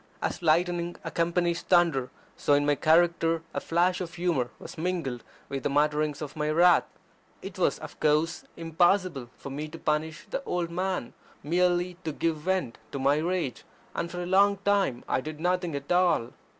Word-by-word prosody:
As -, -, -3 dB
lightning 175 Hz, +1 st, +1 dB
accompanies 170 Hz, 0 st, 0 dB
thunder, 165 Hz, -8 st, +3 dB, 0.3 s
so 145 Hz, -, +1 dB
in 145 Hz, 0 st, +3 dB
my 145 Hz, -, +3 dB
character 165 Hz, +2 st, +3 dB
a -, -, -1 dB
flash 180 Hz, +2 st, +1 dB
of 175 Hz, -1 st, -6 dB
humour 170 Hz, -9 st, 0 dB
was -, -, -10 dB
mingled 160 Hz, -8 st, -2 dB, 0.2 s
with 135 Hz, -1 st, -4 dB
the -, -, -1 dB
mutterings 150 Hz, +1 st, +1 dB
of 145 Hz, -, -7 dB
my 150 Hz, -1 st, -1 dB
wrath. 175 Hz, +3 st, +5 dB, 0.6 s
It -, -, -8 dB
was, -, -, +2 dB
of -, -, -10 dB
course, 155 Hz, +2 st, +1 dB
impossible 165 Hz, -4 st, +1 dB
for 140 Hz, -, -8 dB
me 150 Hz, +3 st, -4 dB
to 160 Hz, +2 st, -9 dB
punish 155 Hz, +1 st, -2 dB
the 275 Hz, -, -2 dB
old 175 Hz, -6 st, -2 dB
man 185 Hz, -7 st, -2 dB, 0.3 s
merely 175 Hz, +2 st, +1 dB
to 160 Hz, -, -2 dB
give 160 Hz, +2 st, -1 dB
vent 165 Hz, -6 st, -2 dB
to -, -, -2 dB
my 140 Hz, +2 st, +3 dB
rage; 170 Hz, -4 st, -2 dB, 0.3 s
and 170 Hz, -, -3 dB
for 175 Hz, 0 st, -4 dB
a -, -, -4 dB
long 200 Hz, +2 st, +4 dB
time 195 Hz, -12 st, +2 dB
I -, -, +1 dB
did 155 Hz, +2 st, -7 dB
nothing 180 Hz, -2 st, 0 dB
at 140 Hz, +2 st, -6 dB
all. 175 Hz, -9 st, +3 dB
165 Hz, 175 wpm, -28 LUFS, 150-180 Hz, 0.6 s, wrath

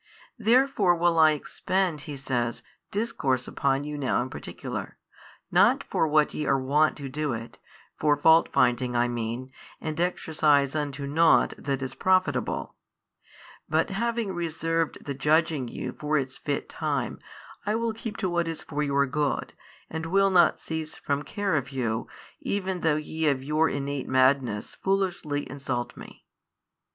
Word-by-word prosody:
Therefore 230 Hz, -5 st, +4 dB
will 170 Hz, -1 st, +2 dB
I 155 Hz, -1 st, +7 dB
expend 175 Hz, +2 st, -1 dB
(He 145 Hz, -, -5 dB
says) 120 Hz, -3 st, -2 dB, 0.3 s
discourse 140 Hz, -, -1 dB
upon 135 Hz, 0 st, 0 dB
you 150 Hz, 0 st, -5 dB
now 135 Hz, -, +1 dB
in 130 Hz, -, -8 dB
particular, -, -, -6 dB, 0.5 s
not -, -, +4 dB
for 160 Hz, -, 0 dB
what 150 Hz, 0 st, +3 dB
ye 150 Hz, -, -2 dB
are 135 Hz, -, +3 dB
wont 145 Hz, +4 st, +2 dB
to 140 Hz, -2 st, -6 dB
do 145 Hz, 0 st, -2 dB
it, 115 Hz, 0 st, -7 dB, 0.4 s
for 150 Hz, -1 st, +3 dB
faultfinding 130 Hz, -6 st, +4 dB
I 120 Hz, 0 st, +3 dB
mean 120 Hz, +2 st, -4 dB, 0.3 s
and 155 Hz, 0 st, -4 dB
exercise 150 Hz, -5 st, +2 dB
unto 145 Hz, -2 st, -3 dB
nought 160 Hz, +4 st, +4 dB
that 135 Hz, -1 st, -3 dB
is 130 Hz, 0 st, -4 dB
profitable: 185 Hz, -, +1 dB, 1.0 s
but 160 Hz, +5 st, +1 dB
having 230 Hz, 0 st, -1 dB
reserved 165 Hz, -1 st, -2 dB
the 140 Hz, -, -3 dB
judging 150 Hz, -1 st, +2 dB
you 125 Hz, +2 st, -5 dB
for 150 Hz, +3 st, -1 dB
its 130 Hz, -2 st, -2 dB
fit -, -, -3 dB
time, -, -, -2 dB, 0.5 s
I 210 Hz, -, +2 dB
will 230 Hz, 0 st, 0 dB
keep 225 Hz, 0 st, -6 dB
to 190 Hz, -, -1 dB
what 170 Hz, -1 st, 0 dB
is 165 Hz, -1 st, -5 dB
for 150 Hz, -1 st, -3 dB
your 140 Hz, -1 st, +2 dB
good, 145 Hz, +1 st, -1 dB, 0.3 s
and 160 Hz, +1 st, -5 dB
will 195 Hz, +3 st, +3 dB
not 180 Hz, -2 st, +5 dB
cease 160 Hz, -1 st, -5 dB
from 140 Hz, 0 st, -2 dB
care 200 Hz, +3 st, -1 dB
of 135 Hz, -3 st, -1 dB
you, 115 Hz, -4 st, -2 dB, 0.3 s
even 190 Hz, -2 st, -2 dB
though 160 Hz, -2 st, +3 dB
ye 160 Hz, +1 st, -2 dB
of 135 Hz, -3 st, +1 dB
your 155 Hz, +3 st, +2 dB
innate 140 Hz, -1 st, -3 dB
madness 130 Hz, -5 st, +2 dB
foolishly 185 Hz, -7 st, -1 dB
insult 130 Hz, -3 st, -4 dB
Me. -, -, -13 dB
150 Hz, 155 wpm, -27 LUFS, 135-170 Hz, 1.0 s, I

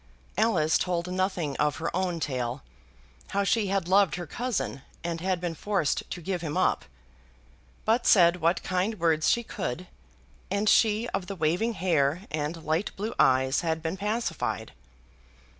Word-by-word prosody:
Alice 165 Hz, -9 st, +3 dB
told 180 Hz, 0 st, -1 dB
nothing 185 Hz, -6 st, -1 dB
of 150 Hz, -1 st, +1 dB
her 165 Hz, +1 st, -3 dB
own 180 Hz, -2 st, -1 dB
tale, 130 Hz, -3 st, -3 dB, 0.6 s
how 200 Hz, 0 st, 0 dB
she 205 Hz, +1 st, +2 dB
had 195 Hz, -3 st, 0 dB
loved 195 Hz, +1 st, +4 dB
her 175 Hz, 0 st, -5 dB
cousin 235 Hz, -, -3 dB, 0.2 s
and 170 Hz, -1 st, -3 dB
had 185 Hz, -1 st, 0 dB
been 175 Hz, -1 st, -3 dB
forced 180 Hz, -2 st, -1 dB
to 175 Hz, -, -5 dB
give 185 Hz, 0 st, -2 dB
him 155 Hz, -3 st, -3 dB
up, -, -, +1 dB, 1.0 s
but 230 Hz, +2 st, +2 dB
said 175 Hz, -4 st, +6 dB
what 165 Hz, +3 st, +2 dB
kind 185 Hz, +3 st, -1 dB
words 160 Hz, -2 st, +2 dB
she 235 Hz, -, +2 dB
could, 180 Hz, -, -4 dB, 0.6 s
and 200 Hz, +2 st, 0 dB
she 220 Hz, +2 st, +4 dB
of 180 Hz, -, -3 dB
the 195 Hz, -, -5 dB
waving 175 Hz, +8 st, +1 dB
hair 165 Hz, -3 st, +1 dB
and 155 Hz, +2 st, -3 dB
light 160 Hz, +6 st, 0 dB
blue 215 Hz, +3 st, -3 dB
eyes 130 Hz, +1 st, +4 dB
had 160 Hz, -2 st, -2 dB
been 165 Hz, +2 st, -2 dB
pacified. 170 Hz, -, -2 dB
175 Hz, 160 wpm, -27 LUFS, 155-200 Hz, 1.0 s, said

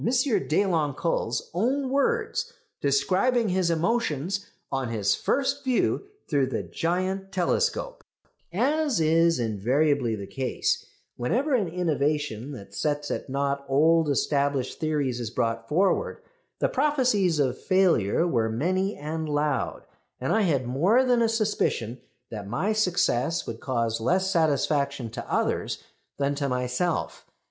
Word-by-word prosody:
Deloncle's 190 Hz, -, 0 dB
own 260 Hz, +8 st, 0 dB
words 445 Hz, -, 0 dB, 0.3 s
describing 195 Hz, -, +2 dB
his 180 Hz, -1 st, +1 dB
emotions 185 Hz, -, 0 dB, 0.2 s
on 135 Hz, -2 st, -1 dB
his 105 Hz, -3 st, +1 dB
first 280 Hz, +1 st, 0 dB
view 260 Hz, +9 st, +1 dB, 0.2 s
through 140 Hz, -4 st, +2 dB
the 130 Hz, -, -2 dB
giant 185 Hz, +3 st, -2 dB
telescope: 460 Hz, -, -1 dB, 0.5 s
"As 280 Hz, -, +1 dB
is 165 Hz, +1 st, +3 dB
invariably 120 Hz, +3 st, +1 dB
the 100 Hz, -2 st, -6 dB
case, 130 Hz, +4 st, -2 dB, 0.3 s
whenever 255 Hz, -, 0 dB
an 220 Hz, -7 st, +2 dB
innovation 150 Hz, -7 st, -1 dB
that 100 Hz, -6 st, -10 dB
sets 145 Hz, +6 st, -1 dB
at -, -, -4 dB
nought 140 Hz, +1 st, -1 dB
old 160 Hz, +3 st, +4 dB
established 140 Hz, -2 st, 0 dB
theories 145 Hz, -6 st, -1 dB
is 120 Hz, -3 st, -3 dB
brought 115 Hz, -1 st, -2 dB
forward, 185 Hz, +6 st, +1 dB, 0.3 s
the -, -, +2 dB
prophecies 255 Hz, -, +2 dB
of 130 Hz, -4 st, +1 dB
failure 175 Hz, -, +3 dB
were 115 Hz, -9 st, +1 dB
many 185 Hz, -, 0 dB
and 155 Hz, +1 st, -4 dB
loud, 145 Hz, -1 st, -1 dB, 0.3 s
and 130 Hz, -, 0 dB
I 220 Hz, -, +3 dB
had 145 Hz, -10 st, +1 dB
more 180 Hz, -, +3 dB
than 245 Hz, -2 st, +3 dB
a 230 Hz, -, +3 dB
suspicion 210 Hz, -, -1 dB, 0.3 s
that 105 Hz, -3 st, -6 dB
my 160 Hz, -, 0 dB
success 170 Hz, -, +1 dB
would -, -, -6 dB
cause 115 Hz, -6 st, -1 dB
less 185 Hz, +10 st, +1 dB
satisfaction 140 Hz, -, +1 dB
to -, -, -7 dB
others -, -, -1 dB, 0.3 s
than 140 Hz, 0 st, 0 dB
to 140 Hz, -1 st, -2 dB
myself. 125 Hz, +7 st, -2 dB
155 Hz, 130 wpm, -26 LUFS, 135-195 Hz, 0.5 s, old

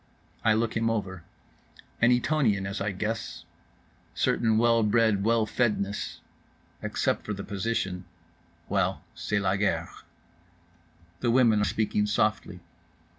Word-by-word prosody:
I 110 Hz, -1 st, +4 dB
look 115 Hz, 0 st, 0 dB
him 115 Hz, 0 st, +1 dB
over; 95 Hz, -5 st, -3 dB, 0.8 s
an 120 Hz, +1 st, +5 dB
Etonian, 125 Hz, -6 st, +2 dB
as 100 Hz, 0 st, -4 dB
I 105 Hz, -, 0 dB
guess. 105 Hz, -3 st, -4 dB, 0.7 s
Certain 110 Hz, -2 st, +2 dB
well 115 Hz, 0 st, +4 dB
bred 105 Hz, -2 st, +2 dB
well 115 Hz, 0 st, +3 dB
fedness. 105 Hz, -4 st, -1 dB, 0.6 s
Except -, -, -1 dB
for 105 Hz, -, -4 dB
the 100 Hz, 0 st, -6 dB
position—well, 90 Hz, -5 st, -4 dB
c'est 105 Hz, -, -2 dB
la 100 Hz, -1 st, +1 dB
guerre. 105 Hz, +1 st, 0 dB, 1.3 s
The 120 Hz, -, 0 dB
women 115 Hz, -3 st, +4 dB
are -, -, +2 dB
speaking 105 Hz, -1 st, 0 dB
softly. 105 Hz, -4 st, 0 dB
105 Hz, 120 wpm, -27 LUFS, 100-115 Hz, 1.3 s, an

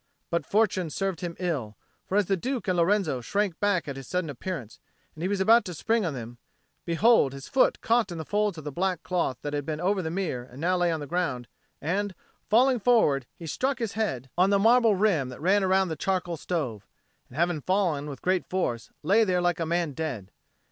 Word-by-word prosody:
But 170 Hz, -, -1 dB
fortune 200 Hz, -5 st, +1 dB
served 190 Hz, +2 st, -2 dB
him 175 Hz, -2 st, -4 dB
ill; 140 Hz, -13 st, -3 dB, 0.3 s
for 195 Hz, -, 0 dB
as 205 Hz, -, +3 dB
the 195 Hz, -, +1 dB
Duke 245 Hz, +4 st, -3 dB
and 185 Hz, -, +2 dB
Lorenzo 170 Hz, -6 st, +2 dB
shrank 200 Hz, -, -1 dB
back 200 Hz, -6 st, +1 dB
at 140 Hz, -1 st, -5 dB
his 135 Hz, -2 st, -9 dB
sudden 180 Hz, -4 st, -2 dB
appearance, 140 Hz, -, -6 dB, 0.3 s
and 155 Hz, -, -11 dB
he 180 Hz, -, 0 dB
was 200 Hz, 0 st, -1 dB
about 225 Hz, +5 st, +5 dB
to 180 Hz, -, -5 dB
spring 225 Hz, +3 st, +1 dB
on 150 Hz, -, -3 dB
them, 120 Hz, -1 st, -8 dB, 0.5 s
behold, 170 Hz, -, +4 dB
his 135 Hz, -1 st, -9 dB
foot 265 Hz, -, +2 dB
caught 230 Hz, -4 st, +2 dB
in 170 Hz, -, -5 dB
the 160 Hz, -, -5 dB
folds 210 Hz, -1 st, 0 dB
of 155 Hz, -, -7 dB
the 150 Hz, -, -5 dB
black 180 Hz, +2 st, -1 dB
cloth 170 Hz, -9 st, -1 dB
that 145 Hz, -, -3 dB
had 145 Hz, 0 st, -1 dB
been 155 Hz, +2 st, -4 dB
over 190 Hz, +3 st, +1 dB
the 160 Hz, -, -3 dB
mirror 165 Hz, -8 st, -2 dB
and 125 Hz, +1 st, -13 dB
now 180 Hz, +4 st, +1 dB
lay 175 Hz, -1 st, +2 dB
on 160 Hz, -2 st, -2 dB
the -, -, -4 dB
ground, 140 Hz, -7 st, -2 dB, 0.3 s
and, 190 Hz, +5 st, -2 dB, 0.3 s
falling 250 Hz, +3 st, +4 dB
forward, 175 Hz, -, +3 dB
he 170 Hz, -, -9 dB
struck 260 Hz, -, -1 dB
his 230 Hz, -5 st, -3 dB
head 130 Hz, -, -2 dB
on 185 Hz, +2 st, +5 dB
the 200 Hz, -, +4 dB
marble 225 Hz, +1 st, +5 dB
rim 185 Hz, -10 st, +2 dB
that 125 Hz, -, -9 dB
ran 195 Hz, +6 st, +3 dB
round 190 Hz, -1 st, +2 dB
the -, -, -2 dB
charcoal 180 Hz, +1 st, -1 dB
stove, 135 Hz, -, -3 dB, 0.4 s
and, 130 Hz, -, -12 dB
having 170 Hz, -2 st, +1 dB
fallen 170 Hz, -5 st, 0 dB
with 135 Hz, -3 st, -9 dB
great 185 Hz, 0 st, 0 dB
force, 125 Hz, -11 st, -2 dB
lay 200 Hz, +8 st, +4 dB
there 185 Hz, -4 st, +1 dB
like 175 Hz, -1 st, +1 dB
a 165 Hz, -, -1 dB
man 170 Hz, -2 st, 0 dB
dead. 135 Hz, -11 st, -5 dB
175 Hz, 225 wpm, -27 LUFS, 150-200 Hz, 0.5 s, about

